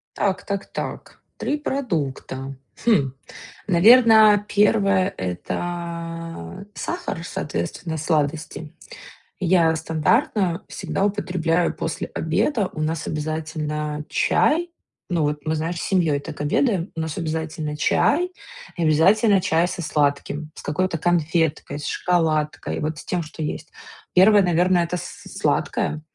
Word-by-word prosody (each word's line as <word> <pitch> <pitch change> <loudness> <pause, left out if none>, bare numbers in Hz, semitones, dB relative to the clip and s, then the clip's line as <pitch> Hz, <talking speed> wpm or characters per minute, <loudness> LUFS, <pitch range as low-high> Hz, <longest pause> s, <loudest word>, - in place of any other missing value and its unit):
Так, 195 -2 0
так, 200 -1 -3
так, - - -7
3 295 - -1
продукта. 145 - -3 0.3
Хм, 150 - +3 0.6
наверно, 215 +1 +7
1 200 -2 +3
это 165 - -5
сахар, 345 - -4
соответственно, 160 - -4
сладости. 155 0 -2 0.7
Я, 170 -3 +3
стандартно, 170 - +1
всегда 195 - -2
употребляю 180 -4 0
после 160 - -4
обеда. 195 - 0
У 155 - -6
нас 160 +1 -2
обязательно 150 -1 -3
чай, 340 +3 +2 0.4
ну, 170 -3 +1
вот 150 0 -1
мы, 155 - 0
знаешь, 165 +3 -2
с - - -4
семьёй 165 -7 +2
так 140 - -9
обедаем. 180 - +1
У - - -2
нас 160 -1 -3
обязательно 160 -2 -3
чай 335 - +2 0.4
и 175 - -2
обязательно 195 +7 +4
чай 170 -1 +2
со 180 - -5
сладким, 150 0 -1
с - - -10
какой-то 180 +4 -1
конфеткой, 165 -2 0
с 145 - -7
шоколадкой, 155 -3 0
вот 155 +1 -2
с - - -9
тем, 180 -1 -1
что 160 0 -8
есть. 155 +1 -4 0.4
1, 200 +3 +7
наверно, 180 +1 +3
это 170 +1 0
с - - -8
сладкое. 155 - 0
165 Hz, 125 wpm, -23 LUFS, 155-190 Hz, 0.7 s, наверно